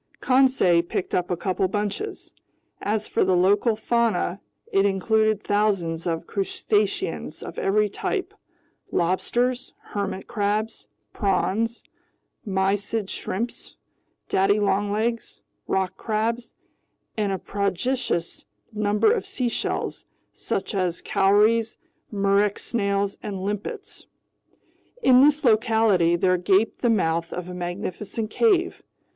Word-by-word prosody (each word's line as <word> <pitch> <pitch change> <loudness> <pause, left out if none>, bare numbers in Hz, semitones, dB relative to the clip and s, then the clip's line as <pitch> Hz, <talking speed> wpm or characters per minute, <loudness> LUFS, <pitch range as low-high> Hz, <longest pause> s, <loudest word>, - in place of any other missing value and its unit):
Conseil 255 -10 +4
picked 170 +1 -4
a - - +3 0.2
couple 185 +1 0
bunches. 205 - -4 0.5
As 215 +1 -1
for - - +1
the 185 -1 +2
local 200 +5 +3
fauna, 220 -5 0 0.3
it 195 - +4
included 215 +2 +1
thousands 190 -6 0
of 165 -1 -2
crustaceans 205 - -1
of - - -7
every 210 +2 +2
type: 375 - -3 0.6
lobsters, 240 +9 0 0.2
hermit 200 -2 -3
crabs, 215 0 -2 0.3
prawns, 220 +3 0 0.6
mysid 200 +1 -1
shrimps, 230 +5 -4 0.5
daddy 200 +2 +2
longlegs, 205 - -1 0.3
rock 190 -1 -1
crabs, 230 +2 -2 0.6
and 210 -2 0
a 190 - -1
prodigious 200 - -2 0.3
number 210 - +2
of 435 -5 -3
seashells, 255 -11 -2 0.3
such 195 - -3
as 185 -3 -1
cowries, 215 +3 +3 0.3
murex 200 0 +1
snails, 200 -3 -1
and 200 -2 -5
limpets. 210 - -5 1.0
In 255 -1 +7
this 295 +1 +4
locality 220 -7 +3
there 185 +1 +2
gaped 195 +4 +1
the 240 - +2
mouth 165 -6 +1
of 180 0 -5
a 180 - -7
magnificent 185 +4 -4
cave. 385 -6 +2
205 Hz, 105 wpm, -24 LUFS, 190-225 Hz, 1.0 s, In